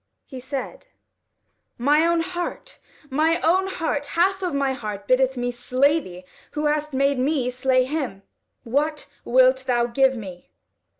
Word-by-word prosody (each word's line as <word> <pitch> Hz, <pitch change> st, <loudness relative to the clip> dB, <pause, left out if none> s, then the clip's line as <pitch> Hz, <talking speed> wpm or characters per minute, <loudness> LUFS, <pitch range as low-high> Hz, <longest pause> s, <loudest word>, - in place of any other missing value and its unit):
He 260 Hz, -, -9 dB
said: 265 Hz, -, -6 dB, 0.9 s
"My 295 Hz, +6 st, +3 dB
own 340 Hz, -1 st, +2 dB
heart! 355 Hz, +8 st, -5 dB, 0.3 s
my 315 Hz, +4 st, +2 dB
own 375 Hz, +4 st, +2 dB
heart! 320 Hz, -6 st, -2 dB
Half 380 Hz, +3 st, +2 dB
of 365 Hz, -2 st, -1 dB
my 280 Hz, -2 st, 0 dB
heart 210 Hz, -5 st, -6 dB
biddeth 260 Hz, 0 st, +2 dB
me 245 Hz, 0 st, -1 dB
slay 255 Hz, +5 st, +2 dB
thee, 180 Hz, -, -11 dB, 0.3 s
who 300 Hz, 0 st, -2 dB
hast 300 Hz, 0 st, 0 dB
made 275 Hz, 0 st, +1 dB
me 260 Hz, -2 st, 0 dB
slay 255 Hz, 0 st, +2 dB
him. 260 Hz, -8 st, -4 dB, 0.4 s
What 295 Hz, +5 st, -1 dB, 0.2 s
wilt 260 Hz, +1 st, +4 dB
thou 240 Hz, -2 st, +2 dB
give 265 Hz, +2 st, +2 dB
me?" 185 Hz, -5 st, -9 dB
270 Hz, 145 wpm, -23 LUFS, 250-310 Hz, 0.9 s, wilt